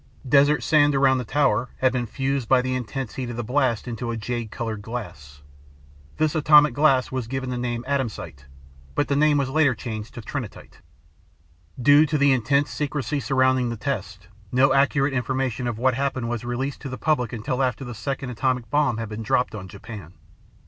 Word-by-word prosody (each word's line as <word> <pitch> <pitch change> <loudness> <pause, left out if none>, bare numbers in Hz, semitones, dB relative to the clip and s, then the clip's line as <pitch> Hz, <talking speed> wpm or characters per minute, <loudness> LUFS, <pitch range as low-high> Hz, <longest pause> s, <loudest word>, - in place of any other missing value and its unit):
Desert 145 +3 +4
sand 145 -2 +4
around 135 -1 +4
the - - -3
tower 125 -2 +1
had 130 -1 +2
been 125 -2 -1
fused 135 0 -2
by 130 - +5
the 130 0 -1
intense 130 0 -4
heat 130 -2 -4
of 120 - -5
the 120 - -2
blast 125 -1 0
into 120 0 -4
a 115 - -2
jade 115 0 -4
colored 110 -1 -4
glass. 75 - -8 0.7
This 155 -1 +1
atomic 150 -3 +5
glass 135 -2 +3
was 130 -3 -3
given 130 +1 -3
the - - -2
name 120 -1 -3
Atomsite, 115 - -3 0.5
but 145 - 0
the 140 - +2
name 150 0 +4
was 135 -2 -1
later 145 -3 +3
changed 110 0 -7
to 120 - -6
Trinitite. 125 -2 -7 1.0
Due 145 +4 +6
to 150 +1 0
the 140 -1 +4
intense 140 +4 +1
secrecy 145 -2 -2
surrounding 130 -2 +2
the 115 - -4
test, 100 -7 -4 0.2
no 130 +2 +4
accurate 140 0 +2
information 130 -1 -1
of 120 -3 -3
what 130 +2 +2
happened 130 -2 -2
was 120 -1 -3
released 130 +3 -3
to 135 - -6
the 130 - -6
public 125 -7 0
until 125 +3 -2
after 130 0 -1
the 120 - -6
second 135 +3 -4
atomic 125 0 -1
bomb 145 -6 +2
had 115 -1 -4
been 105 +1 -6
dropped 125 +2 0
on 100 -3 -7
Japan. 100 -2 -10
130 Hz, 190 wpm, -24 LUFS, 115-140 Hz, 1.0 s, Due